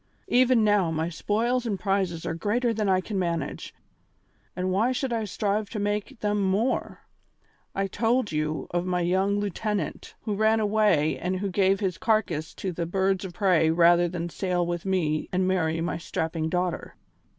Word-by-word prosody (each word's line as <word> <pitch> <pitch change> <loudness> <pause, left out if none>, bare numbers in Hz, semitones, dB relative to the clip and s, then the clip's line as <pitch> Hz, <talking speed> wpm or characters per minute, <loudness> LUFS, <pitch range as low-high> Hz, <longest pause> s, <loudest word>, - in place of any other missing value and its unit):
Even 250 -2 +4
now, 205 -5 +3
my 160 +1 -1
spoils 230 +8 0
and 200 -4 -2
prizes 190 -4 -1
are 165 - -2
greater 230 +8 0
than 215 -2 -1
I 185 -1 +3
can 200 +1 -3
manage, 170 -2 -3 0.8
and 185 +1 -1
why 215 +7 +2
should 255 -1 -2
I 225 -2 -1
strive 205 +1 -1
to 210 - -4
make 205 +2 -2
them 210 0 0
more? 200 +6 0 0.7
I 195 - 0
told 225 +3 0
you 155 0 -2
of 175 0 0
my 180 -1 -1
young 190 +3 +1
lieutenant, 205 -3 -3
who 215 - -2
ran 220 +2 +3
away 205 -8 +2
and 185 +2 -1
who 195 +1 -3
gave 195 +1 +2
his 185 -3 -1
carcass 205 -9 0
to 190 - -3
the 170 -1 -3
birds 190 +1 0
of 185 -2 -6
prey 180 -6 +3
rather 175 +1 +5
than 175 0 -4
sail 180 0 -1
with 175 +1 -3
me 160 -5 0
and 185 0 +1
marry 165 -4 +1
my 165 -1 -2
strapping 160 -1 -2
daughter. 180 0 -2
190 Hz, 175 wpm, -26 LUFS, 175-210 Hz, 0.8 s, rather